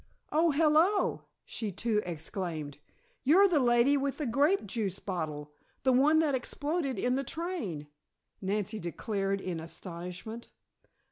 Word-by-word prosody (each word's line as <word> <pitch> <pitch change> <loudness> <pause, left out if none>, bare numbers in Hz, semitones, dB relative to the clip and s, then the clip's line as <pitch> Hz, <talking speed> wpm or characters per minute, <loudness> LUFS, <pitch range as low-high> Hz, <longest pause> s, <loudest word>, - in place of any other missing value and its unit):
"Oh, 325 +2 +4
hello!" 320 +6 +3 0.2
she 215 -3 -4
too 215 +2 0
exclaimed. 160 -3 -4 0.4
"You're 360 +9 +6
the 340 -6 +3
lady 240 +2 +4
with 275 0 -1
the 300 - -2
grape 285 - +2
juice 200 -2 -2
bottle 155 -7 -4 0.3
the 260 - +4
one 290 +5 +5
that 300 -3 +1
exploded 285 +2 -1
in 250 - +1
the 270 +2 0
train!" 275 - -4 0.6
Nancy 205 +2 -1
declared 195 +2 -2
in 180 -3 -3
astonishment. 180 +7 -7
230 Hz, 130 wpm, -30 LUFS, 185-290 Hz, 0.6 s, You're